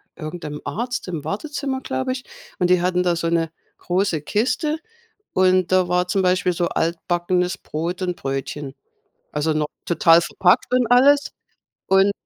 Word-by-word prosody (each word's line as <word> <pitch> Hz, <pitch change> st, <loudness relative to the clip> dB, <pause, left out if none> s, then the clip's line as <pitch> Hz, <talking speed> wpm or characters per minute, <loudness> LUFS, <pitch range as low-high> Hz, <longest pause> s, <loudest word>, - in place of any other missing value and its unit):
irgend 165 Hz, +1 st, -7 dB
'nem 150 Hz, -1 st, -6 dB
Arzt 240 Hz, -2 st, -3 dB
im 165 Hz, -5 st, -4 dB
Wartezimmer, 265 Hz, -, -3 dB
glaube 260 Hz, 0 st, -2 dB
ich, 255 Hz, -1 st, -6 dB, 0.4 s
und 180 Hz, -1 st, +2 dB
die 180 Hz, -1 st, +4 dB
hatten 180 Hz, 0 st, +1 dB
da 175 Hz, -1 st, +2 dB
so 165 Hz, 0 st, -2 dB
'ne 165 Hz, -1 st, 0 dB, 0.3 s
große 180 Hz, -4 st, 0 dB
Kiste 295 Hz, -, 0 dB, 0.6 s
und 185 Hz, -1 st, +3 dB
da 185 Hz, -1 st, +3 dB
war 180 Hz, 0 st, +1 dB
zum 195 Hz, +1 st, +1 dB
Beispiel 185 Hz, 0 st, +2 dB
so 175 Hz, 0 st, 0 dB
altbackenes 175 Hz, +2 st, -1 dB
Brot 170 Hz, +4 st, -4 dB
und 180 Hz, -1 st, -2 dB
Brötchen. 135 Hz, +1 st, -4 dB, 0.6 s
Also, 155 Hz, +1 st, 0 dB
noch 150 Hz, -1 st, 0 dB, 0.2 s
total 165 Hz, 0 st, +5 dB
verpackt 180 Hz, +5 st, +2 dB
und 250 Hz, -2 st, +3 dB
alles 285 Hz, +3 st, +5 dB, 0.6 s
und 195 Hz, +1 st, +4 dB
180 Hz, 155 wpm, -22 LUFS, 165-200 Hz, 0.6 s, total